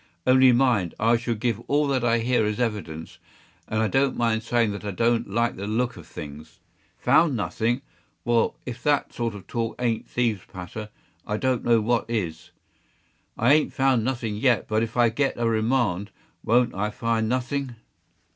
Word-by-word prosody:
Only 130 0 +6
mind, 120 -8 +2
I 115 +2 +4
shall 120 0 -1
give 115 -1 -1
all 145 +1 +2
that 130 -3 0
I 120 0 +3
hear 120 0 +1
as 105 +1 -1
evidence; 105 -9 -4 0.5
and 110 0 0
I - - +2
don’t 135 +3 +1
mind 115 -2 +1
saying 115 -1 +1
that 100 - -6
I 105 - -3
don’t 115 +3 +1
like 115 +4 0
the 100 +2 -5
look 120 +3 -1
of - - -12
things. 75 +2 -10 0.4
‘Found 160 -5 +3
nothing!’ 115 +3 -1 0.4
well, 120 -2 +2
if 120 -1 -6
that 145 0 +1
sort 115 -3 -2
of 95 -3 -10
talk 115 0 -3
ain’t 115 -3 -1
thieves’ 115 -5 0
patter, 105 +4 -7 0.4
I 105 - -1
don’t 130 0 0
know 115 -2 +4
what 115 +2 0
is. 85 -8 -3 0.9
I 120 +5 +4
ain’t 155 0 +2
found 130 -4 +2
nothing 120 -4 -2
yet; 120 +1 +2
but 110 0 +1
if 115 +1 -3
I 120 -1 +5
get 135 +5 0
a 120 -1 0
remand, 110 -4 +1 0.3
won’t 120 +2 +3
I 105 +2 -1
find 110 0 -1
nothing! 130 +1 -2
115 Hz, 180 wpm, -25 LUFS, 110-125 Hz, 0.9 s, Only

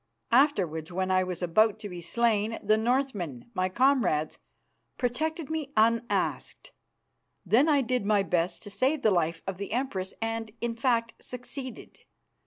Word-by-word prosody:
Afterwards, 185 - +2
when 185 +1 -1
I 185 0 +3
was 180 -1 -4
about 215 +5 +3
to 210 - -5
be 175 -2 -7
slain, 225 +3 +1
the 215 +1 +4
Northmen, 220 - -1
my 185 -2 0
comrades, 195 - +2 0.6
protected 310 +6 -2
me 310 -3 -3
unasked; 230 - 0 0.7
then 265 +8 +4
I 290 -2 +4
did 250 -2 -1
my 205 -1 +3
best 175 -2 -1
to 205 - -8
save 265 +8 0
the 215 - +5
life 165 -2 0
of 195 -2 -4
the 200 0 -6
Empress, 215 -7 -2
and, 225 0 -3
in 235 -1 -2
fact, 230 -1 +1
succeeded. 250 0 -8
225 Hz, 150 wpm, -28 LUFS, 185-255 Hz, 0.7 s, the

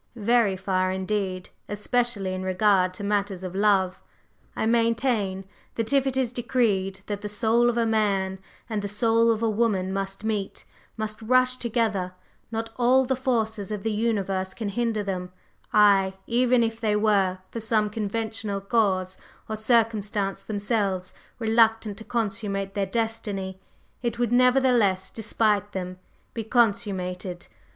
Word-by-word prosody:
"Very 225 -3 +2
far 185 -1 0
indeed, 190 -1 -2 0.2
especially 205 -2 -1
in 185 - -4
regard 185 0 +2
to 205 - -7
matters 200 -2 -1
of 185 -1 -5
love. 195 -2 +2 0.5
I - - -1
maintain 230 -4 +1 0.3
that 230 +3 -1
if 275 -1 +3
it 265 -1 -1
is 250 -2 0
decreed 215 -6 0
that 205 -1 -4
the 210 - -4
soul 230 +3 +3
of 240 - -1
a 230 - +2
man 200 -4 0 0.3
and 215 -3 -2
the 205 - -3
soul 225 +3 +2
of 225 0 +1
a - - +3
woman 205 -4 0
must 195 +1 -4
meet, 210 -3 -3 0.3
must 215 0 -4
rush 255 +2 +3
together, 215 -6 -1 0.4
not 225 0 -3
all 255 +2 +4
the 265 +1 0
forces 220 -5 -1
of 210 -2 -4
the 225 - 0
universe 195 -4 -1
can 220 -3 -3
hinder 225 0 -1
them; 180 -2 -4 0.4
aye, 195 -2 +5
even 245 0 +3
if 225 0 -3
they 215 -2 +1
were, 200 -3 +2
for 230 - -4
some 220 -1 +1
conventional 215 -1 -3
cause 195 -3 0 0.3
or 220 - -3
circumstance 215 -3 +1
themselves 200 -3 -1 0.2
reluctant 225 -2 +2
to - - -8
consummate 200 -4 -2
their 195 -1 -1
destiny, 205 -4 -3 0.4
it 235 -2 -2
would 240 -1 0
nevertheless, 245 -6 +3
despite 210 -2 0
them, 185 -1 -5 0.3
be 225 - -3
consummated. 195 -6 0
210 Hz, 145 wpm, -25 LUFS, 195-230 Hz, 0.5 s, aye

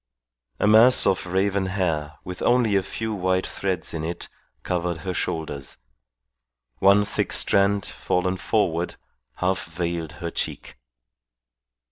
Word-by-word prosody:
A - - +2
mass 110 +4 +7
of 95 -1 +1
raven 95 +1 0
hair 80 -6 -1
with 90 0 -7
only 120 -4 +3
a 95 - +4
few 110 +3 -4
white 95 -1 0
threads 95 -4 -3
in 80 -1 -3
it 85 +2 -5 0.3
covered 90 -1 -1
her 90 - -2
shoulders; 75 -6 -4 1.0
one 100 +2 +5
thick 105 - -2
strand 100 +1 +3
fallen 90 +1 -1
forward 90 -4 0 0.4
half 95 0 -1
veiled 85 -1 -4
her 85 +1 -5
cheek. - - -4
95 Hz, 125 wpm, -24 LUFS, 85-100 Hz, 1.0 s, mass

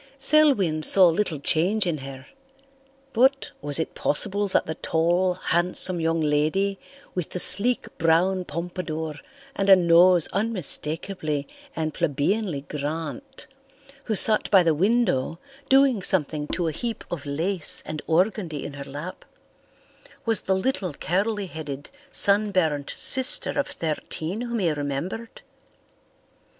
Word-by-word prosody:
Selwyn 270 - +3
saw 185 +4 +7
little 165 -1 -2
change 185 +9 0
in 165 -4 -3
her. 135 -1 -10 0.9
But 265 +4 +1
was 145 -1 -3
it 160 - -4
possible 200 +7 -1
that 190 - 0
the 160 - -4
tall, 175 +3 -1
handsome 180 0 -1
young 165 0 -1
lady 155 +7 -1 0.3
with 180 -4 -4
the 180 - -6
sleek 235 +7 +3
brown 180 +3 +1
pompadour 160 -1 -6 0.4
and 195 0 -2
a 195 - +9
nose 175 -1 +4
unmistakably 165 -6 -2 0.3
and 155 -1 -3
plebeianly 165 +2 -2
Grant, 160 - -7 0.6
who 220 - -2
sat 215 +2 +6
by 190 -3 +5
the 165 -2 +1
window 180 - 0 0.3
doing 270 -5 +3
something 155 -5 -1
to 175 +1 -3
a - - -1
heap 230 +8 -6
of 150 -4 -6
lace 165 +5 -1
and 155 -1 -6
organdy 175 -2 -1
in 145 - -8
her 140 -1 -8
lap, 150 +6 -8 1.0
was 225 -3 +2
the 190 - -1
little 190 - -3
curly 205 +5 -2
headed, 150 -5 -9 0.2
sunburned 190 - +2
sister 260 +2 +7
of 285 0 -2
thirteen 165 - -4
whom 240 -1 -4
he 180 -6 0
remembered? 150 +10 -6
175 Hz, 130 wpm, -23 LUFS, 155-205 Hz, 1.0 s, a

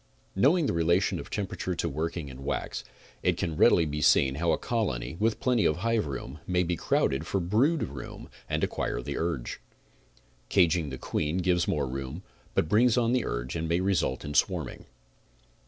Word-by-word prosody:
Knowing 145 - +4
the - - 0
relation 85 +3 +2
of - - -8
temperature 95 -2 -3
to 85 - -1
working 80 +1 -3
in 65 0 -9
wax, - - -3 0.4
it - - +1
can 80 -3 -2
readily 85 +2 +5
be 75 0 -3
seen 65 -2 +4
how 80 +4 0
a 80 - +2
colony, 70 - -2
with 110 +1 +1
plenty 125 -4 +2
of 75 - +3
hive 110 -1 0
room 70 +1 -6
may 90 0 +2
be 90 0 -1
crowded 70 -1 0
for 100 - 0
brood 115 - +2
room 65 -2 -7 0.2
and - - -1
acquire - - -1
the - - -4
urge. 80 -7 -2 0.9
Caging 85 -4 +3
the 65 - -6
queen 75 +6 -2
gives 90 -1 +1
more 70 -3 0
room, 65 +7 -5 0.3
but - - +2
brings 115 +6 +4
on 120 -1 +2
the 125 -2 +1
urge - - -3
and 80 0 -2
may 85 +1 +2
result 95 -8 0
in 75 - -5
swarming. - - 0
85 Hz, 185 wpm, -28 LUFS, 75-100 Hz, 0.9 s, readily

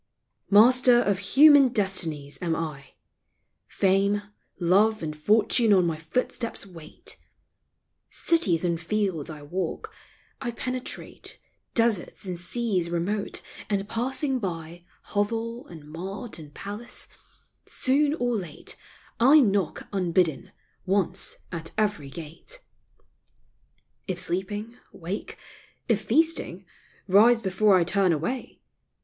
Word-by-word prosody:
Master 245 +4 +6
of 200 -5 +1
human 280 +6 +7
destinies 185 - -1
am 170 -2 0
I. 150 -5 -6 0.7
Fame, 200 +1 +2 0.4
love, 200 +4 +3
and 155 -1 -4
fortune 215 +7 +3
on 185 -2 +4
my 165 -2 -1
footsteps 230 +7 -2
wait. 165 -5 -9 0.9
Cities 185 - +2
and 170 -1 -1
fields 185 -5 -1
I 150 -2 -8
walk; 175 +3 -4 0.5
I - - -2
penetrate 255 +2 -5 0.4
Deserts 230 -5 +1
and 180 -2 -4
seas 185 -2 0
remote, 190 +5 -2 0.3
and 200 -1 -1
passing 260 +4 -1
by 170 -3 -6 0.3
Hovel, 230 +3 -2
and 160 -3 -11
mart, 190 +7 -7
and 150 -2 -11
palace 205 - -6 0.4
— - - -40 0.2
soon 285 +3 +2
or 245 -4 0
late 175 -8 -5 0.4
I 275 +6 +7
knock 200 - +1
unbidden 175 -5 +1 0.3
once 190 -1 0
at 165 -2 -6
every 205 -10 0
gate! 170 - -8 1.4
If 185 -2 -3
sleeping, 205 +7 -1
wake 180 +4 -6 0.3
— - - -32
if 220 -4 +2
feasting, 275 - +1 0.4
rise 225 +5 +5
before 195 +1 +3
I 180 - +4
turn 190 +1 +2
away. 170 - -3
195 Hz, 115 wpm, -26 LUFS, 170-230 Hz, 1.4 s, human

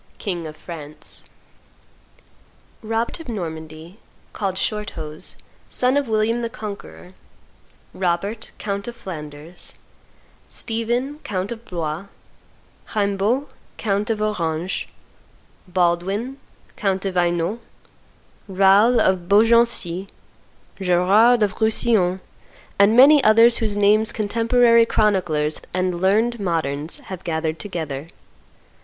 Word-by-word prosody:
king 175 -5 -4
of 155 0 -10
France; 155 -3 -8 1.6
Robert 225 +4 -2
of 325 - -10
Normandy, 160 -2 -7 0.3
called 195 -3 -2
Shorthose, 185 -7 -3 0.3
son 255 +1 +1
of 285 -2 +1
William 220 +2 +1
the 230 - -2
Conqueror; 210 -5 -9 0.8
Robert, 190 +5 -2
count 200 0 -4
of 240 - -6
Flanders; 160 -5 -9 0.7
Stephen, 240 +5 -2
count 195 -6 -4
of 235 -1 -7
Blois; 170 0 -4 0.9
Raimbault, 205 +6 0 0.3
count 205 -1 -1
of 215 -1 0
Orange; 175 -4 -2 0.8
Baldwin, 185 +8 0 0.4
count 195 -3 -1
of 195 - -1
Hainault; 175 +4 0 0.9
Raoul 200 +5 +5
of 185 -2 +1
Beaugency; 210 -4 +3 0.7
Gerard 200 +6 +4
of 210 +2 -2
Roussillon, 215 -4 +2 0.6
and 205 +3 +5
many 280 +2 +8
others 230 +2 +6
whose 215 -3 -1
names 215 +2 +3
contemporary 230 +2 +3
chroniclers 175 -9 +1
and 185 -1 -1
learned 220 +5 +2
moderns 160 -5 -2
have 185 -2 -8
gathered 160 -1 -2
together. 160 -7 -5
200 Hz, 100 wpm, -21 LUFS, 175-225 Hz, 1.6 s, many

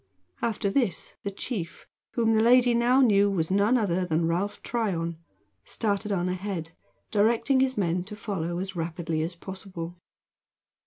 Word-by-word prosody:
After 215 -3 0
this 230 -5 0
the 200 - -3
chief, 195 -3 -5 0.3
whom 225 -2 +3
the 220 - +4
lady 245 +1 +5
now 240 +3 +4
knew 205 -5 +5
was 175 -4 -1
none 205 +6 +4
other 185 -5 +1
than 165 -1 +1
Ralph 195 +5 -1
Tryon, 170 -8 -2 0.4
started 210 - -1
on 180 -2 0
ahead, 180 -3 -3 0.4
directing 230 +5 +3
his 260 0 +1
men 175 -2 +1
to 210 - -8
follow 180 -5 -3
as 190 +1 -4
rapidly 165 -1 -2
as 170 +3 -3
possible. 180 -2 -8
195 Hz, 150 wpm, -27 LUFS, 175-225 Hz, 0.4 s, lady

